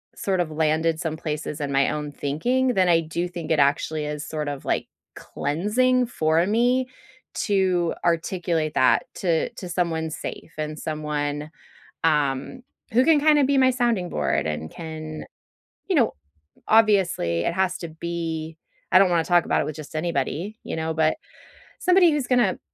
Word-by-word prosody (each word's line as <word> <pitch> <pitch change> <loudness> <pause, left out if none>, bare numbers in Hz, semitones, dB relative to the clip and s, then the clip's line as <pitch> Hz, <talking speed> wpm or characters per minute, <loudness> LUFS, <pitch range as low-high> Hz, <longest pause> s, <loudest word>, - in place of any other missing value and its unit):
sort 190 -2 -1
of 165 -3 -3
landed 160 +1 +1
some 160 -2 -3
places 150 -1 -4
in 140 -1 -2
my 135 0 +3
own 150 -1 -4
thinking, 240 - 0
then 185 -2 +3
I 165 -1 +5
do 170 +2 -3
think 170 -3 -6
it 155 - +3
actually 150 +2 +1
is 150 0 -5
sort 150 -2 -3
of, 145 -1 -6
like, - - -1 0.3
cleansing 235 - 0
for 160 -6 +1
me 245 +5 +2 0.5
to 185 -4 +1
articulate 170 -2 0
that 130 - +4
to 170 -4 0
to 180 - -7
someone 170 -2 -1
safe 165 - -7
and 155 0 -4
someone, 150 -1 -3 0.5
um, 150 - 0 0.3
who 250 - +5
can 320 -2 +5
kinda 300 -1 +5
be 280 +1 +2
my 260 -1 +5
sounding 235 -8 0
board - - 0
and 75 +1 -4
can 155 -1 -7 0.7
you 380 - +1
know, 245 -6 +3 0.5
obviously, 195 - +3
it - - 0
has 190 -1 0
to 170 - -5
be 160 -1 -4 0.3
I 185 - +7
don't 195 -1 +5
wanna 170 -2 +2
talk 175 -2 +3
about - - +1
it - - -2
with 155 - -5
just 155 0 -10
anybody, 170 +5 -2
you - - -5
know? 160 0 -2
But 155 0 +2 0.6
somebody 360 -2 +5
who's 290 -4 -1
gonna 240 -7 +2
165 Hz, 165 wpm, -24 LUFS, 155-200 Hz, 0.7 s, I